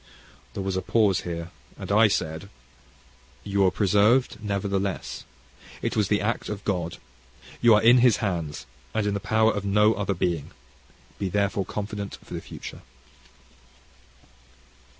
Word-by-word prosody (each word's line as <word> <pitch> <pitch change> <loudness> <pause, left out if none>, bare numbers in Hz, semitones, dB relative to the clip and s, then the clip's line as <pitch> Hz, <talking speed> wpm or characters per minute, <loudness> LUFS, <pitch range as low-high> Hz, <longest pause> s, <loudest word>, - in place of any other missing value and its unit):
There 100 - -3
was 95 -1 -2
a 95 - 0
pause 105 -4 +2
here, 85 0 -5 0.3
and - - -6
I 110 +2 +6
said, 90 -2 -2 0.9
"You 100 0 0
were 95 - +5
preserved 105 +5 +2
nevertheless. 100 -1 -2 0.6
It - - -1
was 105 -3 +2
the 105 +1 +1
act 110 +3 -2
of 105 -1 -5
God. 90 -4 -2 0.6
You 120 -2 +7
are 105 - +3
in 120 +2 +7
His 120 -6 +5
hands 85 -7 -3 0.3
and 110 - +1
in 105 - 0
the 100 - -1
power 110 +2 +2
of 100 - -3
no 105 +2 +4
other 100 -2 -2
being: 85 -4 -2 0.7
be 95 - -1
therefore 100 0 0
confident 100 -1 -5
for - - -10
the - - -4
future." - - -9
100 Hz, 150 wpm, -25 LUFS, 95-105 Hz, 0.9 s, You